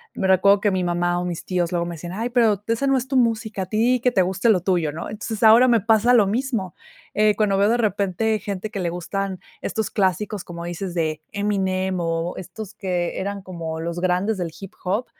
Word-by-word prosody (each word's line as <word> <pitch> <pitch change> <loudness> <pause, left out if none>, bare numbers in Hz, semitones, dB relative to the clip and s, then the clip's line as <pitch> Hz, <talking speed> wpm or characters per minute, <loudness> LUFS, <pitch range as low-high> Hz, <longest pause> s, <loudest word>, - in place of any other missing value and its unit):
me 190 - 0
recuerdo 195 +2 +5
que 205 - +2
mi 185 -1 0
mamá 175 0 0
o 180 - -3
mis 175 -2 -5
tíos 180 -2 -1
luego 170 -1 0
me 175 - -5
decían: 175 +2 -7
"Ay, 225 +5 -2
pero 225 -5 +3
esa 230 +5 0
no 270 -1 +3
es 255 - -3
tu 265 0 0
música. 220 -4 0
A - - -5
ti, 235 +5 +2
que 250 - +5
te 190 -5 +3
guste 190 +5 0
lo 185 -5 +4
tuyo", 175 -5 +1
¿no? 160 +2 -6
Entonces, 215 0 -5
ahora 225 +3 +8
me 235 -2 +4
pasa 225 +3 +3
lo 220 -4 +5
mismo. 220 - -2 0.4
Eh, 210 -1 +3
cuando 210 -2 +2
veo 205 - +4
de 235 - +3
repente, 210 0 0
gente 205 +1 -5
que 200 - -4
le 175 -2 -1
gustan 185 +2 -3 0.2
estos 220 -1 -2
clásicos, 200 +1 0
como 170 -1 -8
dices, 175 +1 -5
de 155 -2 -1
Eminem, 190 -2 0
o 165 +1 -1
estos 200 +3 -8
que 180 -3 -2
eran 200 0 -4
como 165 -4 -5
los 170 +1 -3
grandes 185 +3 0
del 170 -2 -3
hip 195 -2 -9
hop. 205 +7 0
195 Hz, 225 wpm, -22 LUFS, 175-220 Hz, 0.4 s, ahora